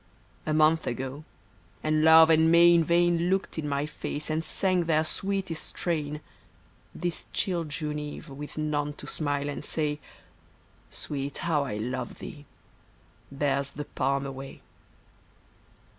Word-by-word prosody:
A 155 - +1
month 155 +1 +4
ago, 135 +4 -4 0.6
and 155 0 +2
Love 160 0 +8
and 160 0 +5
May 170 +1 +7
in 170 -1 +5
vain 170 +1 +3
Looked 190 -3 0
in 150 -2 -3
my 140 +1 0
face 150 0 -4
and 160 +1 0
sang 185 0 +1
their 160 -1 +3
sweetest 190 0 -2
strain, 150 -3 -3 0.7
This 175 -1 -3
chill 175 -4 0
June 150 0 -3
eve 150 0 -7
with 145 +2 -9
none 150 -1 -1
to 145 - -11
smile 145 -1 -1
and 145 - -4
say, 150 -2 -1 0.5
" - - -33
Sweet, 140 -1 -4
how 155 -4 0
I 105 -6 -4
love 125 +3 -4
thee! 145 -2 -9 0.4
" - - -33 0.3
bears 140 0 0
the 145 +1 -6
palm 140 0 -1
away. 135 0 -8
150 Hz, 145 wpm, -28 LUFS, 145-165 Hz, 0.7 s, Love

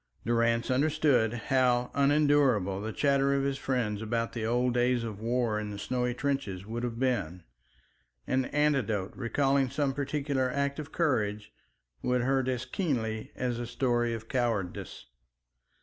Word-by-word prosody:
Durrance 115 +1 +1
understood 140 -4 +3
how 125 +1 +1
unendurable 140 -9 +3
the 110 +1 -3
chatter 140 +1 +2
of 135 - +1
his 135 -1 -1
friends 115 -6 -1
about 115 +1 -2
the 115 -2 -3
old 125 +1 +1
days 125 0 +2
of 110 -3 -5
war 115 -1 0
in 105 -1 -4
the 100 - -6
snowy 125 +3 -1
trenches 125 -10 -2
would 115 +2 -4
have 120 -2 -3
been. 100 -10 -1 0.8
An 130 0 +1
anecdote 130 -11 0
recalling 135 +2 +1
some 140 +1 0
particular 140 -2 -1
act 140 +2 -1
of 155 0 -7
courage 105 -11 0 0.5
would 125 0 +1
hurt 130 +1 +1
as 130 -1 -1
keenly 120 - -2
as 125 -2 -2
a 120 - -4
story 120 -2 0
of 110 0 -9
cowardice. 115 - -2
125 Hz, 150 wpm, -29 LUFS, 115-135 Hz, 0.8 s, understood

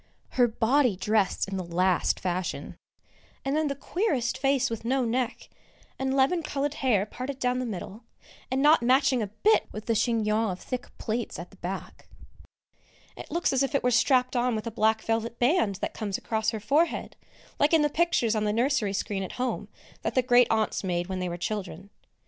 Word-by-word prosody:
Her 245 -2 +3
body 240 +1 +2
dressed 205 0 +1
in 195 0 -4
the 185 - -3
last 180 +1 +1
fashion, 180 0 -3 0.7
and 270 +2 0
then 310 0 +1
the 280 - -2
queerest 280 - -1
face 270 0 +2
with 230 -3 -5
no 255 +2 +1
neck, 240 +1 -2 0.5
and 265 0 0
lemon 275 +6 +3
coloured 290 -2 -2
hair 250 -10 +1
parted 255 +5 -6
down 250 -1 0
the 255 - -2
middle, 210 +2 -7 0.4
and 265 +2 0
not 300 0 +6
matching 260 +1 +3
a 210 - -1
bit 320 - +2
with 215 - -7
the 230 - +1
chignon 220 -1 +1
of 185 -1 -4
thick 250 -1 -5
plaits 230 +1 -3
at 175 - -8
the 195 - -18
back. 185 +2 -7 1.1
It - - -9
looks 340 -4 0
as 265 - +2
if 275 +1 0
it - - +1
were 250 - +2
strapped 255 +1 +3
on 245 -1 +1
with 215 - -4
a 230 - -3
black 220 0 +1
velvet 225 +1 -1
band 245 - +2
that - - -2
comes 205 -3 -3
across 220 -1 -1
her 220 -1 -3
forehead, 290 +11 0 0.4
like 290 - +4
in 320 -2 +5
the - - +4
pictures 295 -8 +1
on 215 -1 0
the 210 - +1
nursery 235 -3 +1
screen 200 0 -2
at 190 - -5
home 255 0 -2 0.3
that - - -3
the 255 - +3
Great 245 -1 +5
aunts 220 -2 0
made 175 -1 -2
when 190 -1 -3
they 180 -1 -2
were 175 - -4
children. 195 0 -5
235 Hz, 200 wpm, -27 LUFS, 210-265 Hz, 1.1 s, not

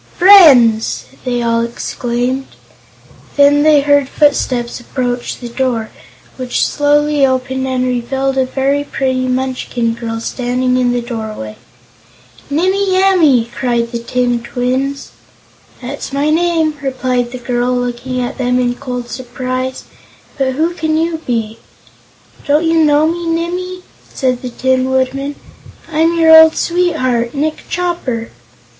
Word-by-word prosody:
"Friends!" 275 - +6 0.2
they 245 -1 -1
all 230 0 +1
exclaimed. 245 +2 -3 0.9
Then 285 0 +5
they 300 -1 +5
heard 285 -1 +2
footsteps 255 -5 0
approach 245 0 -3
the 245 - -8
door, 235 -2 -2 0.5
which 255 -2 -1
slowly 295 0 +1
opened 260 0 0
and 255 -1 -1
revealed 265 +2 -1
a 265 -1 +2
very 275 +2 0
pretty 260 -2 -2
Munchkin 255 -2 -2
girl 225 -1 -5
standing 250 +2 -1
in 250 -1 +2
the 245 -1 -1
doorway. 220 - -6 0.9
"Nimmie 375 +5 +1
Amee!" 310 -12 +3
cried 235 -2 -1
the 235 - -3
tin 245 0 -1
twins. 255 +3 -3 0.7
"That's 275 +3 -6
my 285 +2 0
name," 325 -2 +1
replied 255 -2 -2
the 255 - -6
girl, 245 0 -1
looking 245 +1 -3
at 245 +2 -4
them 250 0 +1
in 245 -1 +1
cold 250 -2 -6
surprise. 255 +1 -5 0.5
"But 265 -2 -1
who 320 +5 0
can 315 -2 -1
you 325 0 -1
be?" 225 -3 -2 0.9
"Don't 300 +3 +2
you 325 0 +3
know 300 0 +3
me, 340 +1 -2
Nimmie?" 360 +2 -3 0.3
said 255 -2 -1
the 250 - -5
Tin 260 +1 0
Woodman. 270 +2 -1 0.6
"I'm 325 +2 +1
your 320 -1 +7
old 320 0 +8
sweetheart, 275 -9 0
Nick 305 +2 -3
Chopper!" 340 -11 -3
260 Hz, 130 wpm, -15 LUFS, 245-295 Hz, 0.9 s, old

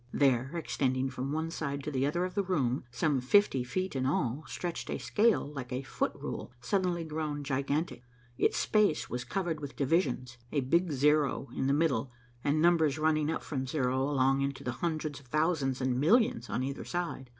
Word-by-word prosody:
There, 130 -2 +3
extending 130 -4 0
from 130 +2 -4
one 160 +2 -2
side 140 -4 -3
to 150 - -3
the 135 0 +1
other 175 +5 0
of 185 - -5
the 205 - +1
room, 140 -10 0
some 140 +1 0
fifty 135 -2 +4
feet 185 +7 -3
in 130 0 0
all, 135 0 0
stretched 175 -2 -4
a - - -1
scale 210 -9 +2
like 130 -3 -6
a 130 +2 -2
foot 130 - -1
rule - - -6
suddenly 175 +5 0
grown 150 -2 -3
gigantic. 140 +1 -1 0.3
Its - - +2
space 210 -7 +2
was 125 0 -2
covered 170 +2 -2
with 145 -2 -7
divisions, 130 -5 0
a 145 - +1
big 170 +6 +2
zero 145 0 +2
in 135 - 0
the - - +3
middle 140 -5 +1 0.3
and 145 +2 +2
numbers 160 -3 +4
running 155 -1 +2
up 160 - -2
from 135 -3 -3
zero 130 0 0 0.2
into 140 0 -2
the 125 - -2
hundreds 155 +2 -3
of 140 - -20
thousands 150 -2 +1
and 130 -1 +1
millions 165 - +3
on 125 - -1
either 135 +1 -4
side. 175 -7 -4
145 Hz, 185 wpm, -31 LUFS, 130-160 Hz, 0.3 s, fifty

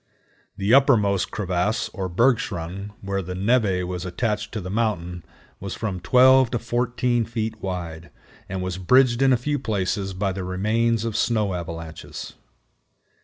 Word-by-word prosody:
The 100 +4 +1
uppermost 110 -9 +4
crevasse, 95 +2 -1
or 95 -3 -4
"bergschrund," 100 -3 0
where 100 0 -2
the 90 0 -6
névé 100 -2 +2
was 90 -1 -4
attached 105 +3 -2
to 110 - -2
the 90 -1 -6
mountain, 90 -6 -1 0.4
was 100 -1 -5
from 100 -5 -3
12 130 +7 +5
to 120 - -1
14 120 0 0
feet 110 -1 -4
wide, 85 -3 -5 0.4
and 95 0 -3
was 95 0 -3
bridged 125 +5 +4
in 135 -1 +5
a 125 - +5
few 145 +4 -2
places 95 -4 -2
by 95 +1 0
the 95 0 -4
remains 110 +5 0
of 115 -2 -3
snow 110 -5 +1
avalanches. 80 -2 -7
100 Hz, 150 wpm, -23 LUFS, 90-115 Hz, 0.4 s, 12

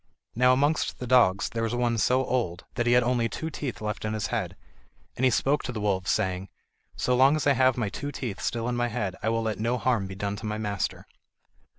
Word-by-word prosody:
Now 125 +2 +4
amongst 145 +4 +1
the 125 - -5
dogs 115 -6 +4
there 115 - -3
was 115 +1 -1
one 120 -1 +1
so 130 +4 +2
old 105 -10 -2
that 120 -1 -1
he 120 - +4
had 125 0 +5
only 120 -1 +1
two 160 +6 -5
teeth 140 -7 -5
left 105 -1 -3
in 110 0 -2
his 110 -1 -2
head, - - -2 0.6
and 130 - -3
he 130 - +6
spoke 140 +4 +1
to - - -3
the 115 - -5
wolves, 95 -2 0
saying: 95 0 0 0.5
"So 125 - +1
long 135 +4 +5
as 155 - -2
I 140 - +5
have 130 -1 +3
my 115 -4 -1
two 145 +7 -5
teeth 120 -7 -5
still 115 0 -2
in 125 - -1
my 120 0 +1
head, 105 -5 -3
I 110 - 0
will 115 0 0
let 110 -3 -2
no 120 +3 0
harm 120 -6 0
be 95 - -8
done 100 +1 -3
to 110 - -8
my 105 0 -2
master." 105 -3 -3
120 Hz, 245 wpm, -27 LUFS, 105-125 Hz, 0.6 s, he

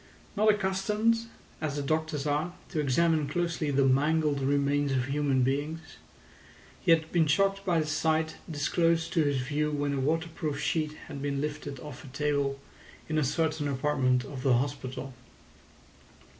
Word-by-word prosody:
Not 215 +1 +4
accustomed, 210 +3 +1 0.3
as 150 -2 -2
the 145 - -2
doctors 155 0 -1
are, 150 +4 0 0.2
to 160 - -2
examine 155 +2 +2
closely 165 -1 -1
the 140 -1 +3
mangled 145 +2 +2
remains 140 +1 +1
of 130 -2 +1
human 135 -1 +1
beings, 145 +5 -1 1.0
he 185 - -2
had 160 -1 +4
been 165 -3 +3
shocked 195 +6 +2
by 175 -4 +2
the - - -2
sight 160 +1 0
disclosed 165 +2 +1
to 165 - +3
his 145 -2 +1
view 150 +4 -1
when 145 -1 -1
a 140 - -1
waterproof 155 0 -1
sheet 155 0 0
had 140 - -7
been 140 -1 -1
lifted 145 -2 -4
off 150 -4 -9
a - - -11
table 140 0 -1 0.5
in 155 0 +1
a - - +2
certain 155 +1 0
apartment 130 -2 +1
of 135 -1 -7
the 130 -1 +3
hospital. 130 0 -3
150 Hz, 155 wpm, -29 LUFS, 140-160 Hz, 1.0 s, Not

